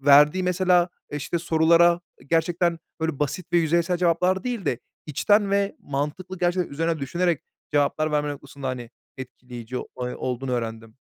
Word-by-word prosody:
Verdiği 145 +6 +6
mesela 180 -1 +3 0.2
e 145 - -3
işte 150 +4 -2
sorulara 170 +1 +4 0.3
gerçekten 165 +1 +1 0.2
böyle 160 -3 -1
basit 150 +5 -2
ve - - +7
yüzeysel 170 +2 +2
cevaplar 180 +2 +2
değil 240 -7 -3
de, 125 - 0 0.3
içten 205 +7 +2
ve 200 0 +1
mantıklı, 150 +7 -4
gerçekten 175 -1 +1
üzerine 165 +2 0
düşünerek 170 +3 0 0.3
cevaplar 150 +1 +1
verme 150 0 +1
noktasında 140 -1 -7
hani 120 -2 -5 0.3
etkileyici 125 -1 -8
oy 125 -1 -5
olduğunu 130 +1 -3
öğrendim. 115 -1 -4
160 Hz, 145 wpm, -25 LUFS, 135-175 Hz, 0.3 s, ve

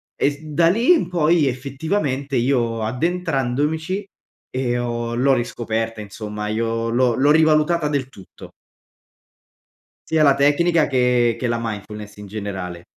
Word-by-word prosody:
e - - +2
s 140 - -10
da 155 +2 +2
lì 230 - +3
in 180 - 0
poi 165 -3 +2
effettivamente 140 +1 -2
io 120 -3 0
addentrandomici 160 - -1 0.5
e 125 -2 -1
ho 120 -1 -3
l'ho 130 +3 +3
riscoperta, 115 -2 -2
insomma 105 0 -6
io 115 +1 -1
l'ho 120 +1 +2
l'ho 140 +4 +3
rivalutata 155 +1 +3
del 140 -3 -2
tutto. 100 -7 -14 1.6
Sia 160 -1 +3
la 140 -2 +6
tecnica, 150 +4 +3
che 125 -3 +2
che 125 - -2
la 120 0 0
mindfulness, 105 -1 -6
in 105 0 -10
generale. 95 -4 -6
130 Hz, 135 wpm, -21 LUFS, 115-155 Hz, 1.6 s, la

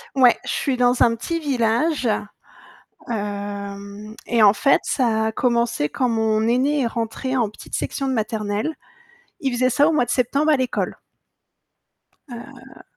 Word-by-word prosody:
Ouais, 255 -3 +5
je - - -4
suis 270 - 0
dans 245 0 +3
un 230 -1 +3
petit 335 +9 -3
village, 260 +1 0 1.1
hem, 200 0 -5
et 230 -2 +2
en 205 -1 +7
fait 275 +7 +3
ça 225 -4 +1
a 220 - -1
commencé 235 - 0
quand 255 - 0
mon 220 -1 +1
aînée 275 +4 +2
est - - +1
rentrée 230 +3 -3
en 230 -5 +1
petite - - -11
section 275 -1 -2
de 265 - 0
maternelle. 215 +4 -2 0.7
Il 265 -3 -1
faisait 255 +1 +2
ça 290 +4 +3
au - - +3
mois 275 -6 +2
de - - -13
septembre 275 +5 +1
à 295 - +4
l'école. 255 -1 -2 1.3
Heu 240 -2 -12
235 Hz, 155 wpm, -22 LUFS, 220-260 Hz, 1.3 s, en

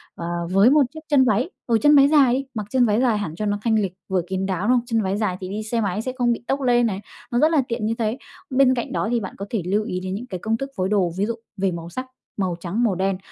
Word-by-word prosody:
ờ, 170 - -6 0.3
với 195 +5 +6
một 295 +1 +5
chiếc 315 - -7
chân 285 -3 +5
váy, 235 - +1 0.2
ừ, 230 -2 +3
chân 295 +3 +6
váy 275 -1 +7
dài 285 -5 +5
đi, 270 +2 -1
mặc 215 -3 -4
chân 255 0 +3
váy 215 +1 +2
dài 240 -4 +2
hẳn 170 -7 -4
cho 215 - -3
nó 205 0 0
thanh 225 0 +1
lịch 195 -4 -2
vừa 190 -1 +1
kín 190 +1 -2
đáo, 190 +1 -2
đúng - - +4
hông? 240 - -2
Chân 230 -2 0
váy 195 0 -1
dài 205 -4 -1
thì 185 - -6
đi 210 +2 -4
xe 230 +2 -1
máy 200 0 -1
sẽ 255 - -3
không 240 -2 +2
bị 235 - -7
tốc 275 +1 0
lên 240 -2 +3
này, 200 -3 -2 0.3
nó 240 - +1
rất 310 +4 +4
là 310 -4 +4
tiện 235 -2 -2
như 220 - +1
thế. 225 +1 0 0.3
Bên 260 0 +4
cạnh 240 -2 -3
đó - - -1
thì 240 - +2
bạn 190 -4 -7
có 200 - -5
thể 220 - -1
lưu 205 +4 +1
ý 180 -3 -3
đến 185 +1 -4
những 240 +5 -6
cái 185 -6 -5
công 220 +4 -1
thức 275 +3 -5
phối 185 0 -1
đồ, 195 -4 +2
ví 200 - +1
dụ 230 +1 -2 0.2
về 190 -1 +1
màu 170 -1 -6
sắc, 255 +9 -5 0.3
màu 185 -3 0
trắng, 190 +7 -2
màu 215 -6 +2
đen 190 +1 0
215 Hz, 310 wpm, -22 LUFS, 190-245 Hz, 0.3 s, váy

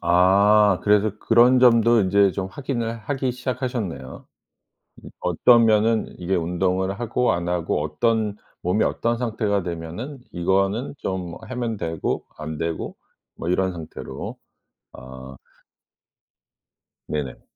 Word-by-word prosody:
아. 95 +3 +4
그래서 105 0 +3
그런 120 +4 +5
점도 115 -2 +5
인제 100 0 +3
좀 95 0 -3
확인을 115 -2 -3
하기 130 +3 -2
시작하셨네요. 125 - -4 0.8
이 - - -10
어떤 115 +7 +4
면은 110 0 +3
이게 90 +2 -1
운동을 90 +3 -1
하고 120 +1 +1
안 85 0 -2
하고 85 -3 -1
어떤 105 +7 0 0.3
몸이 90 +5 +1
어떤 115 0 0
상태가 110 -4 -1
되면은 85 - -6
이거는 95 +8 0
좀 90 -3 -4
하면 115 0 -3
되고 80 -4 -3
안 75 0 -6
되고 80 0 -4 0.4
뭐 85 - -5
이런 95 +1 +1
상태로 80 -3 -7 0.6
어. 65 +1 -11 1.7
네네. 70 -5 -4
100 Hz, 235 characters per minute, -23 LUFS, 85-115 Hz, 1.7 s, 그런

